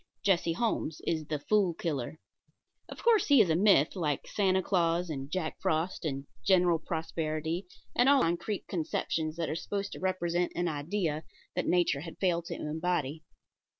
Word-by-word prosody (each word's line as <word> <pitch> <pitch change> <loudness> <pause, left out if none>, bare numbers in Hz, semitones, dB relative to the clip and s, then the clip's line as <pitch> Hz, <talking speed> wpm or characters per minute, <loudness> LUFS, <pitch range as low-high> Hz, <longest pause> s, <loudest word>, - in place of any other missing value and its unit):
Jesse 175 -4 +2
Holmes 165 -7 -1
is 155 -2 -1
the 155 - -1
Fool 185 +3 +2
Killer. 150 -4 -3 0.7
Of - - -9
course 455 -5 +4
he 285 -3 +6
is 190 -7 +5
a - - +3
myth, 185 -5 +4
like 150 -6 -1
Santa 190 -2 +1
Claus 170 -2 +1
and 135 -2 -5
Jack 160 -1 -3
Frost 165 +3 -1
and 135 -2 -3 0.2
General 180 -3 +4
Prosperity 160 +1 -3 0.3
and 245 +2 +5
all 280 -2 +6
those 165 - +3
concrete 185 +4 -3
conceptions 160 -2 -2
that 165 -1 -2
are - - -2
supposed 200 +4 -3
to - - -7
represent 175 -2 0
an 175 0 0
idea 155 +1 -2 0.3
that 180 - -1
Nature 175 -5 +2
has 165 +3 -8
failed 170 -3 +1
to - - -5
embody. 155 -1 -2
170 Hz, 170 wpm, -30 LUFS, 155-185 Hz, 0.7 s, he